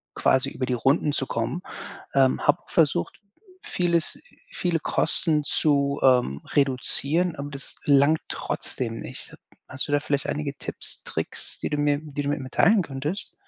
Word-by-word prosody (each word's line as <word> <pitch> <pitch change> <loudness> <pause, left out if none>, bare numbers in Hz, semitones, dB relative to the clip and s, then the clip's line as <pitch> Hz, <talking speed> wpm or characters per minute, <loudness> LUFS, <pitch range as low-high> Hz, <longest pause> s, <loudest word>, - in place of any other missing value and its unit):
quasi 130 +1 +2
über 130 - -3
die 125 - -1
Runden 135 +5 +2
zu 135 - 0
kommen. 115 +10 -2 0.5
Ähm, 135 -1 +3
habe 175 - +3
versucht, 145 - +1 0.4
vieles 175 - 0 0.3
viele 175 -3 0
Kosten 155 0 +1
zu, 140 -1 +1
ähm, 125 - +3
reduzieren, 145 +5 +2
aber 145 +1 -5
das 140 0 -4
langt 145 +2 +4
trotzdem 115 -2 -3
nicht. - - -8 0.3
Hast 130 - -4
du - - -5
da 145 - +3
vielleicht 140 -1 -2
einige 145 -1 -3
Tipps, - - -4
Tricks, - - -5
die - - -3
du 150 - -1
mir 145 0 +2
die 145 -2 -5
du 145 - -1
mir 145 - -1
mitteilen 180 +10 +3
könntest? 150 +7 -4
145 Hz, 155 wpm, -25 LUFS, 135-155 Hz, 0.5 s, langt